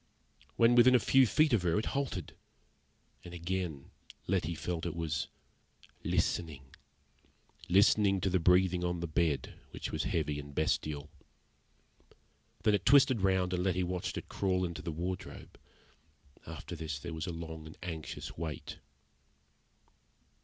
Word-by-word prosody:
When 115 +1 +5
within 120 +1 +7
a - - +6
few 130 +4 +5
feet 150 +6 +3
of 110 - +4
her 85 0 +1
it 110 - 0
halted; 140 -2 -3 0.9
and 90 0 -9
again 85 -4 -4 0.3
Letty 85 -3 0
felt 85 +1 -3
it 85 - -4
was 80 -3 -2 0.8
listening 70 -5 -1 1.0
listening 100 +1 +4
to 95 - +1
the 95 - +3
breathing 90 +1 +3
on 90 0 -1
the 85 - -3
bed, 80 -2 -1
which - - -6
was - - -2
heavy 75 -3 -1
and 70 -1 -10
bestial. 75 -1 -1 1.5
Then 105 - +4
it 105 - +1
twisted 135 -5 +5
round, 95 -1 +2
and 90 0 0
Letty 90 -1 +1
watched 90 0 -3
it - - -6
crawl 95 -2 0
into 85 -1 -5
the 85 - -4
wardrobe. 90 +4 -6 0.9
After 85 +2 -7
this 80 -2 -4
there 80 +4 -7
was 80 +1 -4
a - - -2
long 80 -2 -7
and 80 - -12
anxious 80 -3 -6
wait. 80 -2 -6
90 Hz, 145 wpm, -32 LUFS, 80-95 Hz, 1.5 s, within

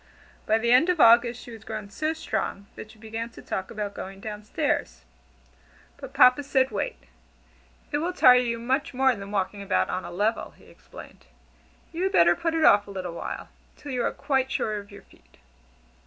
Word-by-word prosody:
By 220 - +3
the 235 +1 0
end 260 +8 +5
of 355 -2 +1
August 235 0 +5
she 240 - -11
was 225 -2 -11
grown 215 -2 -7
so 310 +9 -2
strong, 200 -10 -4
that 215 - -10
she 220 - -17
began 225 +1 -6
to 230 - -14
talk 190 0 -4
about 210 -2 -5
going 195 +1 -8
down 210 0 -7
stairs. - - -2 0.9
But - - -10
Papa 250 +3 +5
said, 265 -2 +1
"Wait." 200 - -4 0.9
"It 290 - 0
will 340 +4 -1
tire 250 -8 +6
you 235 -2 -1
much 255 +4 -2
more 265 0 +3
than 200 -3 -8
walking 200 0 -2
about 200 -1 0
on 185 0 -3
a - - -7
level," 210 +6 -2
he - - -20
explained, - - -14 0.7
"you 335 - -4
had 380 +1 0
better 170 0 +5
put 330 - -2
it 320 -1 +2
off 205 0 +5
a - - -11
little 185 -3 -5
while - - -6 0.3
till 290 - -9
you 250 -2 -1
are - - 0
quite 265 -2 -1
sure 215 -1 -1
of 200 0 -13
your 200 - -13
feet." - - -25
225 Hz, 200 wpm, -25 LUFS, 200-265 Hz, 0.9 s, tire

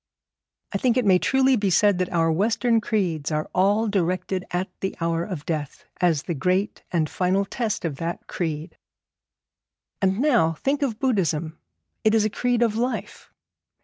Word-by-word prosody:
I 200 - -1
think 250 +1 +2
it 250 - +2
may 185 -2 +5
truly 265 +3 +3
be 205 -4 0
said 190 +1 +3
that 185 - -1
our 165 -2 +2
Western 225 +6 +2
creeds 175 -10 -1
are 155 0 -1
all 205 +4 +2
directed 185 -1 -1
at 180 +2 -1
the 190 - -3
hour 165 0 0
of 175 -6 -6
death, 150 -4 -4 0.2
as 165 -4 +2
the 175 - -3
great 185 +7 0
and 160 -3 +1
final 185 +4 0
test 215 -2 -3
of 150 -4 -3
that 170 +2 -4
creed. 160 -1 -4 1.2
And 190 0 +2
now 235 - +3
think 275 - -1
of 250 -6 -1
Buddhism; 170 - 0 0.4
it 220 0 +4
is 215 -1 +3
a 215 - 0
creed 245 +1 +1
of 225 -2 +1
life. 245 +3 -3
190 Hz, 170 wpm, -24 LUFS, 165-225 Hz, 1.2 s, may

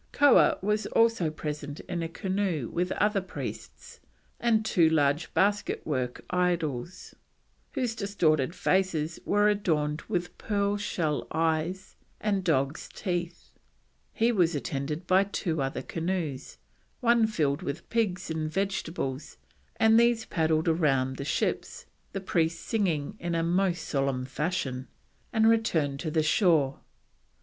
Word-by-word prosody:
Koah 285 -1 +5
was 210 +2 0
also 230 -8 +3
present 150 -1 -5
in 175 -2 -4
a 165 - -3
canoe 185 - -2
with 180 +2 -1
other 210 -1 +1
priests 185 - -8 0.4
and 225 -2 +2
two 170 -6 +4
large 150 0 +1
basket 205 +1 +1
work 130 -5 -3
idols, 175 -3 -1 0.6
whose 250 -5 -1
distorted 175 -8 +1
faces 175 -4 0
were 205 +1 +3
adorned 160 -7 0
with 180 -4 -2
pearl 200 -1 0
shell 165 -7 -2
eyes 165 +4 -1 0.2
and 200 -3 0
dog's 145 -2 0
teeth; 175 -3 -4 0.6
he 230 +2 +2
was 175 -7 +2
attended 145 +4 -3
by 185 +2 +4
two 175 -6 -2
other 135 -1 -2
canoes, 165 -5 -3 0.4
one 235 -3 +4
filled 150 -7 0
with 140 -4 -5
pigs 190 -7 0
and 155 -1 -2
vegetables, 165 -7 -3 0.4
and 220 +1 +5
these 235 -1 +3
paddled 160 -1 +1
round 135 -6 +2
the - - -4
ships, 475 - -2 0.3
the 195 - -3
priests 165 -3 0
singing 190 -6 -1
"in 175 0 -3
most 175 -2 +1
solemn 135 -2 0
fashion," 135 -2 -3 0.4
and 220 -1 +3
returned 160 -12 +2
to 160 - -3
the 155 0 +1
shore. 155 -5 +3
170 Hz, 130 wpm, -28 LUFS, 150-200 Hz, 0.6 s, Koah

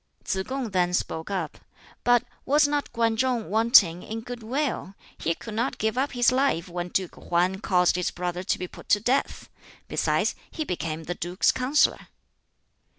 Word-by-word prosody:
Tsz 190 -1 -1
kung 260 -4 -3
then 180 -1 +2
spoke 160 -1 -3
up. 185 -6 -3 0.4
"But 245 -1 +4 0.2
was 290 +2 +4
not 290 0 -1
Kwan 230 -1 +1
Chung 240 -3 0
wanting 215 -6 +5
in 225 +1 -6
good 245 +1 -7
will? 245 -4 -2 0.2
He 165 - -1
could 220 - -9
not 235 +5 -1
give 220 +1 0
up 270 +3 0
his 245 0 +4
life 255 -10 +1
when 175 0 -4
Duke 185 0 -2
Hwan 180 +2 0
caused 180 -4 +3
his 180 - 0
brother 180 0 -3
to 185 - 0
be 180 - -5
put - - -14
to 205 - +5
death. 250 +6 0 0.4
Besides, - - +1 0.2
he 315 - -4
became 165 - -3
the 175 - -3
duke's 175 +2 +1
counsellor." 265 +4 +1
215 Hz, 175 wpm, -26 LUFS, 180-250 Hz, 0.4 s, wanting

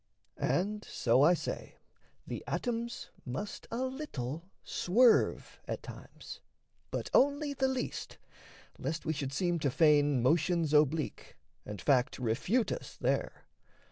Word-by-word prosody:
And 210 +4 0
so 125 +2 +2
I 170 +5 +6
say, - - -5 0.5
The - - -5
atoms 235 -1 -3
must 130 +12 -5
a 240 +3 -2
little 180 - -5
swerve 230 +6 +3
at - - -4
times - - -10 0.5
But - - -4
only 285 +1 +3
the 265 -1 +1
least, 260 -1 -3 0.6
lest 160 0 -3
we 160 - 0
should 140 -3 -3
seem 175 +3 0
to 145 - +1
feign 145 -3 +4
Motions 160 +2 +2
oblique, 150 0 +1 0.3
and 105 -2 -6
fact 130 +4 +2
refute 135 - 0
us - - -6
there. - - -1
165 Hz, 125 wpm, -32 LUFS, 140-235 Hz, 0.6 s, I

